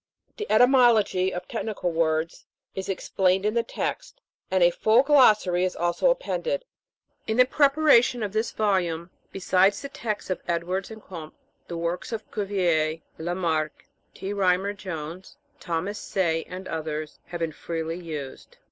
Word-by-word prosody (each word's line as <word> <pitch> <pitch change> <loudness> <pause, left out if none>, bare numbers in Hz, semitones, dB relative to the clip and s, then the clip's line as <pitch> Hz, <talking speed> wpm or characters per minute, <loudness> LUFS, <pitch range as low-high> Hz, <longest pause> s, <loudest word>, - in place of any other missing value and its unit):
The 425 - -5
etymology 230 -6 +4
of 180 0 -6
technical 215 -6 -3
words 160 0 -1 0.3
is 190 0 -5
explained 190 0 +1
in 210 - +1
the 235 - +2
text; - - -4 0.3
and 185 -1 +3
a 175 - +6
full 220 +7 +4
Glossary 215 -11 +5
is 185 - -1
also 175 - +1
appended. - - -1 0.6
In 220 - 0
the 250 - +7
preparation 275 -4 +4
of 205 -1 -3
this 220 +2 0
volume, 180 -5 0 0.2
besides 195 +1 +2
the 280 - -5
text 230 -9 -4
of 185 - -2
Edwards 175 +3 -2
and 220 -1 -11
Comte, 160 -4 -9 0.3
the 170 - -5
works 170 +5 -3
of 220 -2 -6
Cuvier, 175 -6 0 0.2
Lamarck, 160 -3 -2 0.3
T. 195 +1 -4
Rymer 195 0 +1
Jones, 185 - -7 0.2
Thomas 175 +5 -3
Say, 165 -4 -1
and 185 +1 -7
others, 155 -1 -4
have 175 -1 -6
been 165 -1 -1
freely 165 +1 -4
used. 155 - -8
185 Hz, 150 wpm, -25 LUFS, 170-220 Hz, 0.6 s, the